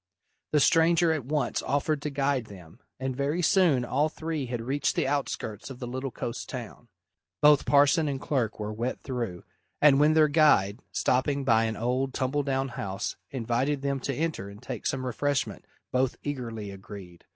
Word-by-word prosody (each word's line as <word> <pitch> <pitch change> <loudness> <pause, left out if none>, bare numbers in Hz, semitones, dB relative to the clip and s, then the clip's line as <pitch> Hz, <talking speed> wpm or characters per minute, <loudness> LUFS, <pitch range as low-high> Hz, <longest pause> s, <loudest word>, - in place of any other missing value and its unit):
The 150 - +4
stranger 165 +2 +4
at 155 -6 -2
once 145 -3 0
offered 145 +2 0
to 150 - -2
guide 140 -3 0
them, 90 -6 -13 0.2
and 130 -1 -2
very 145 +6 -1
soon 160 -8 +4
all 150 +5 +1
three 155 -4 -4
had 120 -1 -3
reached 135 +3 0
the - - +1
outskirts 135 -6 -3
of 135 - -8
the 125 - -6
little 130 +2 -4
coast 120 -1 -5
town. 120 -2 -7 0.5
Both 150 -1 +5
parson 145 +3 +4
and 140 -2 -2
clerk 125 -7 -1
were 105 0 -3
wet 120 +4 -3
through, 120 -9 -4 0.4
and 140 -2 +6
when 150 +1 +4
their 155 -1 +6
guide, 145 -9 +4
stopping 140 +2 +1
by 115 -3 +3
an 110 -1 -2
old, 130 +3 -1
tumble 135 +2 0
down 135 -1 -1
house, 100 -2 -4
invited 130 +3 -1
them 140 -1 0
to 135 +1 -3
enter 155 -11 -2
and 100 +1 -12
take - - -5
some 130 -1 -2
refreshment, 140 +3 -1 0.3
both 130 0 +1
eagerly 115 -7 -4
agreed. 95 -3 -11
135 Hz, 175 wpm, -27 LUFS, 120-145 Hz, 0.5 s, and